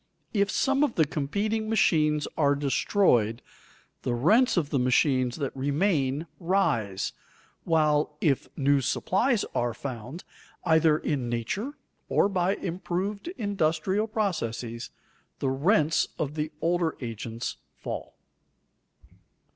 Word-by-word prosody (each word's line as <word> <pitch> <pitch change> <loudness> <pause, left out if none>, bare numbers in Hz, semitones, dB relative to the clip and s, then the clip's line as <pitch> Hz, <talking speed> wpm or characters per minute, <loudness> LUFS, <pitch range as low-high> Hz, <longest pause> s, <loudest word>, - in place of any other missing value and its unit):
If 200 -2 +2
some 275 +5 +2
of 285 -6 0
the 160 - +4
competing 205 +10 -2
machines 155 -8 +2
are 145 -2 +3
destroyed, 135 - +2 0.6
the 120 - -1
rents 210 - +4
of 150 -4 0
the 140 - +2
machines 125 0 +2
that 140 -4 -4
remain 145 +1 0
rise, 140 - 0 0.5
while 150 -2 +2
if 140 -5 +1
new 140 0 +3
supplies 195 - +1
are 120 -1 0
found, 130 +5 -6 0.4
either 160 -2 +4
in 135 -6 -2
nature 155 - -2 0.4
or - - +3
by 190 0 +1
improved 190 - -3
industrial 195 0 0
processes, 125 - -2 0.5
the 135 - -1
rents 155 +3 +2
of 145 -1 -2
the 155 0 -3
older 170 -1 +1
agents 115 -1 -5 0.2
fall. - - -6
155 Hz, 115 wpm, -27 LUFS, 135-195 Hz, 0.6 s, the